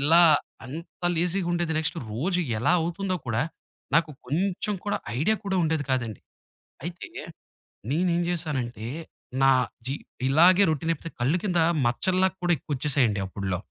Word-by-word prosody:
ఇలా 165 +5 +7 0.4
అంత 165 +6 -9
లేజీగుండేది. 175 -1 0
నెక్స్ట్ 160 +2 -1
రోజు 175 - 0 0.2
ఎలా 120 - +3
అవుతుందో 185 +3 -1
కూడా 120 +3 +1 0.5
నాకు 165 -1 +2 0.2
కొంచెం 185 +8 0
కూడా 205 - +1 0.2
ఐడియా 215 +9 +2
కూడా 190 -1 0
ఉండేది 160 -3 0
కాదండి. 120 -5 -2 0.6
అయితే, 175 +1 -5 0.9
నేను 175 +5 +2
ఏం 175 - +1
జేశానంటే, 135 -10 -2 0.6
నా 135 - +6 0.4
జీ 135 - -1 0.3
ఇలాగే 175 +7 +6
రొటీనైపోతే 165 +1 -1
కళ్ళు 145 +9 +2
కింద 180 -4 +1 0.3
మచ్చల్లా 185 +10 +2
కూడా 175 0 +2
ఎక్కువొచ్చేసాయండి 130 -6 +1
అప్పుడ్లో. 95 -1 -3
165 Hz, 125 wpm, -26 LUFS, 135-180 Hz, 0.9 s, ఇలా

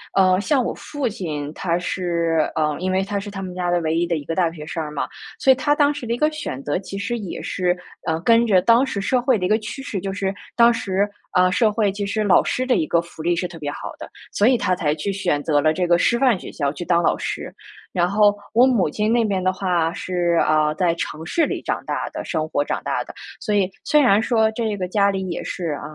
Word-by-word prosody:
呃， 185 -1 +4
像 270 +3 +2
我 - - -2
父 290 -3 -4
亲 155 -9 -4
他 170 -2 -1
是 170 -3 0
呃， 150 -1 +1
因 185 +1 -1
为 190 +1 +1
他 200 0 -2
是 205 +1 -7
他 200 -1 -6
们 185 -1 -6
家 180 -1 -2
的 175 0 +2
唯 160 0 0
一 170 +1 +1
的 170 - 0
一 145 - -7
个 165 - -3
大 170 -2 +1
学 150 -2 -9
生 165 +1 -4
儿 150 - -4
嘛， 145 - -2 0.3
所 265 - +5
以 - - +6
他 290 +3 +1
当 290 -1 +3
时 250 -4 -7
的 230 - 0
一 235 - -2
个 305 +2 +3
选 290 - -5
择 145 +5 -1
其 195 0 -7
实 225 +4 -2
也 195 -5 -6
是， 180 -1 -1 0.3
呃， 160 0 0
跟 230 +4 +4
着 190 -4 +4
当 235 +6 +4
时 235 -7 -3
社 250 +6 +1
会 250 -2 +2
的 180 - -2
一 - - -1
个 215 - +4
趋 230 +5 -7
势， 210 -8 -4
就 195 +1 -4
是 195 -1 -2 0.2
当 235 0 +6
时， 195 -2 0 0.3
呃， 180 0 +4
社 215 +2 +3
会 210 -2 +1
其 200 +1 -4
实 215 +2 -1
老 195 -3 +5
师 255 - -1
的 255 - +2
一 155 - 0
个 170 - +2
福 170 -1 -11
利 170 +2 +1
是 180 +1 -2
特 170 -2 -11
别 145 - -3
好 - - -7
的， - - -8 0.2
所 205 - +2
以 255 -1 +4
他 185 -4 +1
才 150 -3 0
去 160 +6 -3
选 150 -7 -1
择 145 -2 +2
了 155 +1 +3
这 180 +2 0
个 175 0 +4
师 235 - +3
范 245 -6 +3
学 - - -9
校 140 -2 -1
去 150 +4 -6
当 175 0 +2
老 - - +3
师。 - - -5 0.4
然 175 -1 +2
后， 205 +1 +4 0.2
我 245 +3 +6
母 235 -10 +2
亲 210 +8 -1
那 235 -1 +3
边 195 -3 -1
的 185 - +3
话 180 -4 0
是， 175 -2 -1
啊， 155 -1 +2
在 170 +1 +2
城 160 -1 -5
市 320 - +1
里 - - -4
长 - - -2
大 - - -2
的 - - -5
生 155 0 -2
活 145 -2 +1
长 - - -2
大 - - -1
的， - - -10 0.3
所 210 -3 -1
以 195 -2 +3 0.2
虽 300 - +4
然 220 -7 +5
说 220 -2 +2
这 220 -2 -2
个 185 -2 -3
家 200 +2 +2
里 190 -1 -2
也 170 - -4
是， 175 -3 -4
啊， - - -10
190 Hz, 290 characters per minute, -21 LUFS, 170-220 Hz, 0.4 s, 以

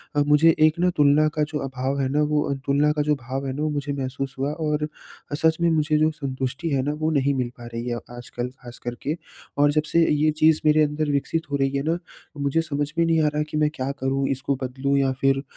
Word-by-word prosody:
अ, 145 - +3
मुझे 155 +2 +6
एक 155 +1 +4
ना, 180 +1 +3
तुलना 150 +1 +5
का 150 - +2
जो 150 - -2
अभाव 135 +1 -2
है 130 - +1
ना 150 +2 +1
वो 150 -1 +3
अ, - - +2
तुलना 145 +2 +3
का 150 0 0
जो 150 0 +2
भाव 135 +1 -5
है 130 - -2
ना, 145 - -4
वो 155 - +1
मुझे 145 -1 -2
महसूस 135 0 -4
हुआ 140 +2 0
और 150 -1 -1
अ, 150 -1 -8
सच 160 +1 +2
में 170 - +4
मुझे 155 -1 +2
जो 155 +1 +3
संतुष्टि 135 +1 -4
है 135 -2 +1
ना, 145 - -1
वो 155 +1 -1
नहीं 140 -2 +2
मिल 125 -2 -1
पा 120 - -10
रही 115 +1 -4
है 120 - -1 0.2
आजकल, 120 0 -5
खासकर 120 0 -7
के। 150 - -1 0.4
और 145 0 +4
जब 155 +1 +1
से 170 0 +4
अ, - - 0
ये 150 +1 +3
चीज़ 155 0 +5
मेरे 155 0 +5
अंदर 150 0 -1
विकसित 145 +2 -1
हो - - +1
रही 135 0 0
है 140 - -2
ना, 170 - 0 0.4
मुझे 140 +3 +1
समझ 145 -2 -2
में 170 - +3
नहीं 165 -1 +3
आ - - +3
रहा 150 - 0
कि 150 - -3
मैं 150 0 +3
क्या 130 +1 -2
करूँ? 135 +1 0
इसको 135 +1 -1
बदलूँ 135 +2 -1
या 135 -1 +2
फिर 135 0 +2
145 Hz, 260 wpm, -24 LUFS, 135-155 Hz, 0.4 s, मुझे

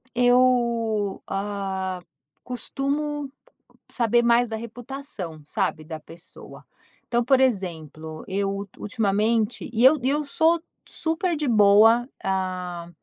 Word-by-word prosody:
Eu, 235 -4 +2
hã, 195 -2 -3 0.4
costumo 280 +3 -3 0.6
saber 240 0 +2
mais 235 +1 +4
da 225 - -3
reputação, 230 - -7
sabe, 185 -3 -2
da 155 0 -7
pessoa. 165 +2 -13 0.4
Então, 240 0 +1
por 260 +2 +4
exemplo, 160 - -2
eu 195 +1 -1
ul 200 0 -4
ultimamente 215 +1 0
e 235 0 0
eu 295 +3 +7
eu 290 +3 +1
sou 320 +3 +2 0.3
super 330 +2 -1
de 295 -1 -2
boa, 225 +2 +5
ah, 185 -2 -3
225 Hz, 110 wpm, -24 LUFS, 190-255 Hz, 0.6 s, eu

